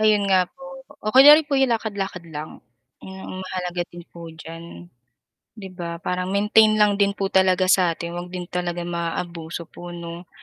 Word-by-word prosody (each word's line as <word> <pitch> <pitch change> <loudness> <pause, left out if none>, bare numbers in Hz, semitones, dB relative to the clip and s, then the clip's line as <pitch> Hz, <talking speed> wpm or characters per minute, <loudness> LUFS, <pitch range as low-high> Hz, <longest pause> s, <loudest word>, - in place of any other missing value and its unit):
Ayun 215 -1 +3
nga 185 -2 +3
po, 270 - -16 0.4
o 215 - -1
kunyari 295 +4 +9
po 290 - -8
'yong 270 -1 +3
lakad-lakad 200 -5 -5
lang. 150 +1 -8 0.4
'Yon 190 - -9 0.2
ang - - -7
mahalaga 180 -1 -3
din 175 0 -10
po 170 0 -11
diyan. 160 - -11 0.7
'Di 200 -3 -8
ba? 170 -2 -6
Parang 180 0 -2
maintain 210 +2 +4
lang 210 -1 +3
din 200 0 +2
po 195 -1 -2
talaga 185 -1 +3
sa 185 -2 +3
atin, 170 0 -6
huwag 175 +1 -6
din 180 0 -6
talaga 175 0 -3
maaabuso 170 -1 -4
po, 175 - -10
'no? 170 +1 -8
180 Hz, 180 wpm, -23 LUFS, 170-200 Hz, 0.7 s, kunyari